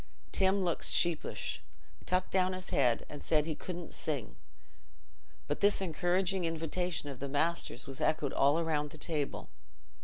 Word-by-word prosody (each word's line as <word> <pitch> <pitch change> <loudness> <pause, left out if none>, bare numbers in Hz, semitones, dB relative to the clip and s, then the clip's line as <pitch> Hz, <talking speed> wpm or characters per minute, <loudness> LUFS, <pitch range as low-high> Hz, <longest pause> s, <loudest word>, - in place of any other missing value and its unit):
Tim 190 0 +3
looked 175 -2 0
sheepish, 170 -2 0 0.5
tucked 185 0 +1
down 185 0 +3
his 185 0 -7
head, 125 -4 +3
and 145 - -8
said 150 -2 +2
he 160 - -1
couldn't 175 +2 -6
sing, 140 -9 -3 1.1
but 145 - -1
this 205 0 +4
encouraging 185 +1 +1
invitation 165 0 -2
of 135 -3 -7
the 140 - -4
master's 145 -2 0
was 135 -1 -7
echoed 150 -3 +1
all 145 +5 +4
round 150 -2 0
the - - -11
table. 150 -4 -2
165 Hz, 150 wpm, -33 LUFS, 145-180 Hz, 1.1 s, this